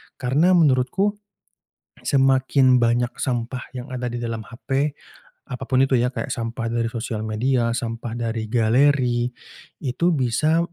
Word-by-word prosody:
Karena 150 +9 +2
menurutku 170 +7 +2 0.8
semakin 130 -1 +3
banyak 120 +1 +1
sampah 125 -1 -2 0.2
yang 125 +1 -7
ada 125 -1 -3
di 120 - -5
dalam 115 -1 -3
HP, 135 +4 -2 0.5
apapun 130 +1 -1
itu 135 - +2
ya, 125 +1 +1
kayak 140 - -4
sampah 115 0 -4
dari 115 0 -1
sosial 115 -2 -4
media, 115 +2 0
sampah 115 -1 -4
dari 115 -2 -3
galeri, 125 +1 +2 0.5
itu 145 +6 0
bisa 150 +3 +1
125 Hz, 130 wpm, -22 LUFS, 115-135 Hz, 0.8 s, semakin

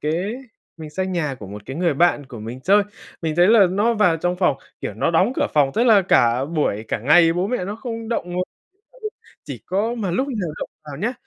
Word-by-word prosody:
cái 170 +8 -1 0.4
mình 155 -2 -9
sang 190 +4 -3
nhà 150 -6 -1
của 105 -6 -10
một 105 +1 -9
cái 135 - -6
người 170 -4 +1
bạn 150 -3 +2
của 125 -4 -10
mình 120 +4 -7
chơi, 200 +6 +4 0.4
mình 155 -1 -2
thấy 175 +1 +6
là 220 -4 +7
nó 210 +5 +1
vào 195 -6 +3
trong 175 +2 -1
phòng, 180 -7 +2 0.2
kiểu, 100 - -4
nó 115 - 0
đóng 185 +8 +3
cửa - - +2
phòng, 145 -3 +4
tức 230 - +2
là 220 -5 +6
cả 130 -8 +3
buổi 145 -9 -1
cả - - -1
ngày 165 +8 +5
bố 180 +3 -1
mẹ 240 -5 -2
nó 205 +3 -5
không 230 -2 -6
động 235 - -1
ng - - -4 1.1
chỉ - - -7
có 215 +6 0
mà 205 -6 -3
lúc 260 +11 0
nào 205 - -3
động - - -5
vào 145 -2 -8
nhá, 225 - -1
175 Hz, 235 wpm, -21 LUFS, 150-205 Hz, 1.1 s, là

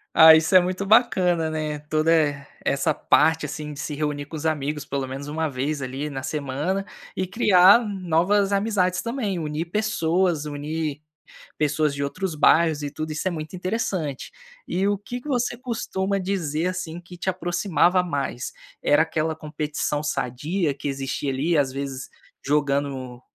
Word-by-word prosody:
Ah, 160 0 +10
isso 160 +4 +2
é - - +11
muito 185 +2 -2
bacana, 190 -7 +3
né. 155 -1 -3
Toda, 155 +1 +2
eh, 145 -3 +2 0.2
essa - - +1
parte, 160 -1 +3
assim, 150 +1 -6
de 140 - -10
se 150 0 -4
reunir 145 -1 -2
com 150 - -9
os 150 - -6
amigos 150 -1 -1
pelo 135 -1 -3
menos 135 +2 -6
uma 155 +1 -1
vez 140 +2 -2
ali 135 +3 -4
na 135 -2 -5
semana 150 +8 -2 0.3
e 185 - 0
criar 190 0 +6
novas 195 0 +1
amizades, 195 -3 +1
também, 230 -6 -2
unir 155 +1 -3
pessoas, 180 -6 +1
unir 150 0 -4 0.6
pessoas 150 0 +1
de 140 - -3
outros 185 +5 -3
bairros 155 0 +4
e 145 - -3
tudo, 155 +2 -5
isso 155 +4 -2
é 185 - 0
muito 155 +2 -6
interessante. 180 - -3 0.4
E 190 +2 0
o 205 - +1
que 240 +5 -7
que 295 - -11
você 245 -3 0
costuma 200 -6 -2
dizer, 180 -4 -1
assim, 175 -2 -4
que 175 0 -13
te 180 - -2
aproximava 180 0 +2
mais? 140 -7 -3 0.3
Era 145 +2 +4
aquela 160 0 -1
competição 150 -1 -3
sadia 150 +3 -1
que 140 +1 -6
existia 135 0 -2
ali, 155 +6 0
às 140 -3 +2
vezes, 135 -1 -5 0.3
jogando 140 -3 -1
160 Hz, 165 wpm, -24 LUFS, 145-185 Hz, 0.6 s, é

